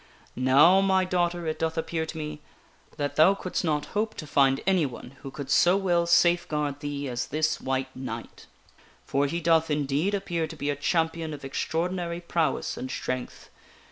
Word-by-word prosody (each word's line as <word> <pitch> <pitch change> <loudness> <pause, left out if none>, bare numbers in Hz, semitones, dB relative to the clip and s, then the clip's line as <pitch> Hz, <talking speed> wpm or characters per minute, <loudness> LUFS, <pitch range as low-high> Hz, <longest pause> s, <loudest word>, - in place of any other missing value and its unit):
Now, 140 +9 +5
my 190 -1 +3
daughter, 175 -1 0
it 155 -1 -3
doth 160 0 -1
appear 160 0 -2
to 160 - -7
me 150 -1 -5 0.6
that 145 -1 -3
thou 165 +6 +6
couldst 185 -1 -3
not 150 -3 0
hope 215 +1 -1
to 155 - -7
find 135 -2 +3
anyone 155 -10 0
who 135 - -7
could 140 0 -7
so 175 +6 +5
well 175 -3 +1
safeguard 155 -5 +2
thee 145 -1 -4
as 120 -1 -3
this 155 +2 0
White 130 0 -2
Knight; 120 -3 -7 0.6
for 140 +1 +1
he 170 +5 -2
doth 165 -1 +3
indeed 150 +6 0
appear 175 -5 -2
to - - -9
be 145 - -2
a - - -2
champion 160 +1 -1
of 140 - -10
extraordinary 170 +4 -2
prowess 165 -4 -1
and 130 - -5
strength. 125 -1 -5
155 Hz, 170 wpm, -27 LUFS, 140-175 Hz, 0.6 s, thou